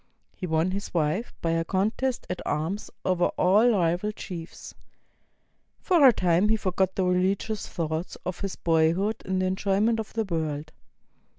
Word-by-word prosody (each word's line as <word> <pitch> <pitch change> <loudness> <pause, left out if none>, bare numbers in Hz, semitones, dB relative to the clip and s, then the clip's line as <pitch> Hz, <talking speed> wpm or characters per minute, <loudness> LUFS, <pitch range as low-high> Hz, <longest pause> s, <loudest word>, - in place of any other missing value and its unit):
He 180 - -5
won 160 +2 +1
his 200 -1 -5
wife 165 +8 0
by 165 - +1
a 165 0 +1
contest 220 +8 -1
at 180 - -4
arms 165 +8 -2 0.2
over 180 -1 +2
all 205 +7 +5
rival 180 -1 +1
chiefs. 175 -5 -8 1.1
For 335 -7 +5
a - - +9
time 180 -1 +2
he 220 - +4
forgot 190 -3 0
the 190 - +1
religious 190 +4 0
thoughts 160 +1 -3
of 180 -1 -4
his 195 -2 -4
boy 160 -1 +3
hood 205 +5 -2
in 190 0 -1
the 185 - +1
enjoyment 200 +4 +1
of 220 - -6
the 225 - 0
world. 155 -4 -3
185 Hz, 165 wpm, -26 LUFS, 165-210 Hz, 1.1 s, a